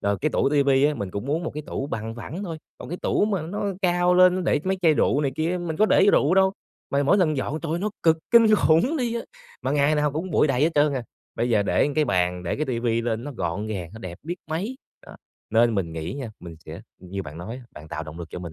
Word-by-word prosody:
rồi 100 0 0
cái 155 - +1
tủ - - +2
ti 145 -1 +3
vi 135 0 +3
á 150 - +3
mình 100 -8 -4
cũng 100 +7 -5
muốn 155 +4 -1
một - - -2
cái 150 - -4
tủ 135 - -3
bằng 115 -4 -4
phẳng 160 - -7
thôi, 165 -4 -5 0.2
còn - - -9
cái 175 - -5
tủ - - +2
mà 195 -6 -1
nó 195 +6 -4 0.2
cao 175 0 +3
lên, 180 0 +6
nó 185 - -1
để 160 -4 +1
mấy 190 0 0
chai 160 -3 +5
rượu 145 - +2
này 140 -2 0
kia 160 +3 0
á, 180 - -1
mình 165 -3 -4
có 215 - +4
để 195 - +4
rượu 155 +6 +4
đâu, 190 0 +4 0.4
mà 140 +1 +2
mỗi 170 +8 +4
lần 155 -5 +2
dọn 150 +4 -2
trời 165 -1 -3
ơi, 170 - 0
nó 210 +3 -2
cực 160 -1 +4
kinh 225 -2 +7
khủng 210 - +3
đi 240 -3 -1
á, 235 - -1 0.4
mà - - -1
ngày 145 +1 +3
nào 150 -1 +1
cũng 170 +4 -4
bụi 155 - +3
đầy 135 -2 0
hết 165 - +4
trơn 145 0 +3
à. 130 - -2 0.3
Bây 120 - -1
giờ 105 -3 +3
để - - +2
một 145 - -3
cái 155 -1 +3
bàn, 90 -5 0
để 85 - -2
cái 155 - -2
ti 120 -3 -1
vi 115 -1 0
lên, 115 +1 -2
nó 145 - -6
gọn 100 -3 -3
gàng, 90 -6 -5
nó 110 - -10
đẹp 90 -3 -8
biết 175 +4 -4
mấy. 200 +11 -3 0.3
Đó, - - -12 0.3
nên 115 +1 +3
mình 85 -5 -2
nghĩ 80 0 -4
nha 135 -5 -6
mình 85 -2 -9
sẽ - - -8 0.2
như 95 +2 -6
bạn 75 +1 -9
nói 110 +8 -6
á, 130 - -11
bạn 75 +1 -12
tạo 80 +1 -4
động 75 +2 -9
lực 85 -1 -7
cho - - -6
mình 85 -2 -7
145 Hz, 295 wpm, -24 LUFS, 110-175 Hz, 0.4 s, kinh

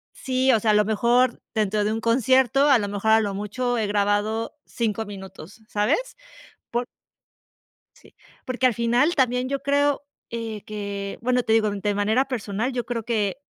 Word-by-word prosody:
sí, 260 0 +1
o 220 - +4
sea, 215 0 +2
a - - +3
lo 210 0 +4
mejor 240 +4 +2
dentro 210 -1 +1
de 210 - 0
un 220 - -1
concierto, 260 +4 +3
a 270 - +7
lo 205 -3 -2
mejor 205 +2 0
a 220 - +6
lo 205 -2 -1
mucho 240 +5 -2
he 215 - 0
grabado 205 +3 0
5 225 -1 -2
minutos, 195 -1 -11
¿sabes? 215 - 0 0.5
Por 240 +1 -1 1.1
sí. - - -21 0.3
Porque, 255 0 -1
al 250 - +4
final 240 +8 +2
también 250 -2 +1
yo 275 -1 -2
creo, 285 +1 +1 0.3
eh, 225 -2 -5
que, 200 -1 -5
bueno, 250 0 +1
te 220 - +1
digo, 220 -1 +3
de 205 0 -2
manera 215 +6 +2
personal, 225 0 -2
yo 245 -1 -2
creo 230 -1 -3
que 215 -1 -1
225 Hz, 180 wpm, -24 LUFS, 205-250 Hz, 1.1 s, a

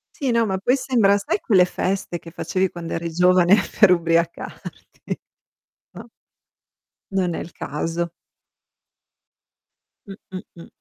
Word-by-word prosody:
Sì, 275 -6 -1
no, 230 -1 +3
ma 190 -3 -1
poi 245 +7 +2
sembra, 240 -7 +3
sai 205 +1 -2
quelle 185 -4 +4
feste 185 -1 -2
che 165 - -12
facevi 185 +2 -1
quando 170 -1 -7
eri 165 0 -3
giovane 180 +2 +5 0.2
per 210 -4 +7
ubriacarti? 170 -1 -1 1.1
No? - - -11 1.0
Non 185 -3 0
è - - -4
il 170 - -8
caso. 165 +3 -3 2.0
Mh, 195 - -7 0.2
mh, 185 - -5 0.2
mh. - - -12
185 Hz, 130 wpm, -22 LUFS, 170-200 Hz, 2.0 s, per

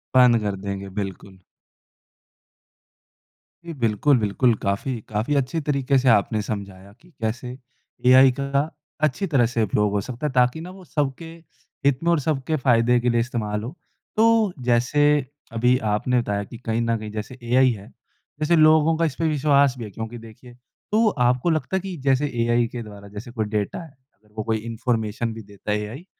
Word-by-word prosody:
बंद 125 -2 +6
कर 105 -2 -2
देंगे। 100 0 -4
बिल्कुल। 95 -1 -8 2.3
जी 170 - -6
बिल्कुल 120 +5 +3
बिल्कुल, 115 +4 +2
काफ़ी, 105 +5 -2
काफ़ी 110 +7 -1
अच्छे 140 +4 0
तरीके 140 -2 +1
से 130 0 +3
आपने 110 0 +3
समझाया 100 -2 -6
कि 175 - -21
कैसे 120 +3 -3 0.5
एआई 130 +1 +7
का 140 +2 0 0.3
अच्छी 155 +6 +1
तरह 135 -8 +3
से 115 -1 0
उपयोग 105 0 +1
हो 100 0 0
सकता 130 +7 -4
है - - -3
ताकि 125 +4 +2
ना 175 - -8
वो 190 0 -13
सबके 145 +1 -2 0.6
हित 140 -1 +3
में 170 - +2
और 170 - +3
सबके 150 +1 -1
फ़ायदे 120 -1 +4
के 120 +1 0
लिए 120 - +2
इस्तेमाल 110 -4 -3
हो। 125 +8 -7 0.4
तो, 225 -3 +4
जैसे 125 +5 +2 0.5
अभी 125 +2 +3 0.2
आपने 125 +4 +1
बताया 100 -2 -2
कि 115 - -11
कहीं 115 +1 0
न 115 0 0
कहीं 105 -1 -7
जैसे 110 +4 -6
एआई 125 +2 +4
है, 100 -3 -8 0.5
जैसे 155 +3 +2
लोगों 155 0 +5
का 165 - +2
इस 150 - -2
पे 165 - +1
विश्वास 140 -3 +3
भी 120 - -6
है। - - -8
क्योंकि 110 +3 -6
देखिए, 115 +2 -13 0.4
तो 220 +2 +4 0.2
आपको 125 +7 +1
लगता 160 +3 -1
है - - 0
कि 190 -1 -6
जैसे 135 +2 +2
एआई 120 0 +2
के 120 - -4
द्वारा 100 -2 -11
जैसे 120 +4 -7
कोई 110 -3 -2
डाटा 105 - -3
है, 165 - -12 0.3
अगर 105 0 -7
कोई 110 +1 0
इन्फॉर्मेशन 115 0 -2
भी 115 - -8
देता 100 0 -7
है 105 - +1
एआई, 115 - -8
120 Hz, 185 wpm, -23 LUFS, 110-140 Hz, 2.3 s, एआई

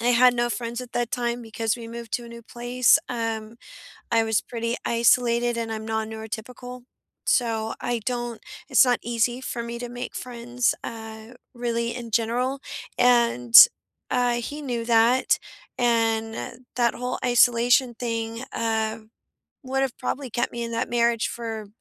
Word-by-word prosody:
I 235 - -2
had 250 +1 +6
no 240 0 +1
friends 235 0 -3
at 250 0 -10
that 240 -1 -1
time 240 0 -2
because 225 0 -2
we 230 -1 -8
moved 235 0 -8
to 240 - -2
a - - -10
new 235 0 -10
place, 245 +4 +3
um, 225 -2 -3 0.5
I 225 -1 +3
was 220 -1 +1
pretty 230 0 -3
isolated, 235 0 +3
and 230 -1 -3
I'm 220 0 -5
non-neurotypical. 220 +3 -5 0.4
So, 225 -3 +1
I 240 -1 -1
don't 240 -2 -3 0.3
it's - - +6
not 250 -1 +2
easy 240 +1 0
for 240 -2 -4
me 235 0 -6
to 245 0 -5
make 245 +1 -6
friends, 245 0 -1
uh, 220 -1 -8 0.3
really, 235 -1 -2
in 235 -2 -7
general, 245 +5 0 0.4
and, 235 - +3 0.6
uh, 245 -1 +2
he 295 +5 -6
knew 240 -4 -3
that, 235 +2 +3 0.4
and 230 0 0
that 240 -2 +2
whole 250 +1 -3
isolation 245 +1 +4
thing, 230 0 -3
uh, 225 -1 -1 0.6
would 270 +1 -1
have 270 -3 -2
probably 270 -2 -3
kept 240 - -1
me 235 0 -4
in 230 - -4
that 230 +3 -1
marriage 235 -1 +2
for 225 -2 -5
235 Hz, 155 wpm, -25 LUFS, 225-245 Hz, 0.6 s, had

